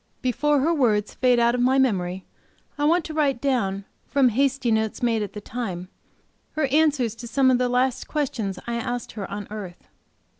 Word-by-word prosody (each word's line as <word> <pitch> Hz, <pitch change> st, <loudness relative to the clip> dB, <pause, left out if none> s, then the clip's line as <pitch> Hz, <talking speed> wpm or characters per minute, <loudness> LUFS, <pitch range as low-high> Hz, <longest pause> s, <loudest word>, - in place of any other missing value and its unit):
Before 290 Hz, +3 st, +2 dB
her 325 Hz, +5 st, +2 dB
words 220 Hz, -8 st, +1 dB
fade 250 Hz, -1 st, +3 dB
out 235 Hz, 0 st, +3 dB
of 245 Hz, -, 0 dB
my 260 Hz, +2 st, +3 dB
memory 190 Hz, -8 st, 0 dB, 0.5 s
I 290 Hz, -, -1 dB
want 330 Hz, +2 st, +3 dB
to 315 Hz, -, -6 dB
write 285 Hz, -5 st, +1 dB
down, 200 Hz, -8 st, -1 dB, 0.2 s
from 270 Hz, -3 st, +3 dB
hasty 265 Hz, +1 st, +1 dB
notes 220 Hz, +1 st, 0 dB
made 230 Hz, -2 st, +2 dB
at 205 Hz, -, -4 dB
the 210 Hz, -, -7 dB
time, 190 Hz, -6 st, -5 dB, 0.6 s
her 310 Hz, -2 st, +1 dB
answer 295 Hz, -3 st, +3 dB
to 230 Hz, +2 st, -8 dB
some 260 Hz, +2 st, +3 dB
of 250 Hz, -, +2 dB
the 250 Hz, -1 st, +1 dB
last 255 Hz, +1 st, 0 dB
questions 235 Hz, -10 st, -2 dB
I 235 Hz, 0 st, -2 dB
asked 245 Hz, +1 st, -4 dB
her 200 Hz, -3 st, -6 dB
on 205 Hz, 0 st, -6 dB
earth. 195 Hz, -5 st, -8 dB
245 Hz, 190 wpm, -24 LUFS, 215-275 Hz, 0.6 s, fade